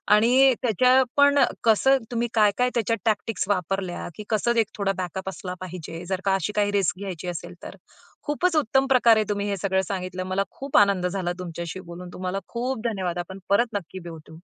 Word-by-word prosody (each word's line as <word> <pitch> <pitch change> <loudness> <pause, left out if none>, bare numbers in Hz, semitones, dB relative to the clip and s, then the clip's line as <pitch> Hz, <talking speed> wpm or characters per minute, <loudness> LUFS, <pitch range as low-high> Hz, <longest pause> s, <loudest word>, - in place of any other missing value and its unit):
आणि 255 +4 +5
त्याच्या 255 +2 +4
पण 285 0 +5 0.2
कसं 250 +5 +4
तुम्ही 240 0 0
काय 210 -2 +4
काय 250 0 +2
त्याच्यात 230 -1 +1
टॅक्टिक्स 215 -2 0
वापरल्या 185 -1 -2
की 210 - -7
कसं 235 +2 +1
एक 220 - +2
थोडा 200 -1 +1
बॅकअप 190 +1 -4
असला 180 -1 -6
पाहिजे 175 -2 -7
जर 190 0 -1
का 195 - +3
अशी 195 +3 -2
काही 205 -1 +2
रिस्क 195 -3 +1
घ्यायची 185 -3 -6
असेल 175 0 -5
तर. - - -8 0.5
खूपच 325 +4 0
उत्तम 270 -1 +2
प्रकारे 235 -4 +5
तुम्ही 205 0 -1
हे 200 - -1
सगळं 190 +1 +1
सांगितलं. 185 -1 -4
मला 185 +1 0
खूप 275 0 -2
आनंद 200 -3 +4
झाला 180 -1 -2
तुमच्याशी 170 0 -6
बोलून. 175 0 -9
तुम्हाला 185 +1 -3
खूप 245 0 -3
धन्यवाद. 185 -5 -2
आपण 190 +2 -6
परत 230 +3 +2
नक्की 190 -1 -5
भेटू. 160 0 -12
200 Hz, 185 wpm, -24 LUFS, 185-235 Hz, 0.5 s, आणि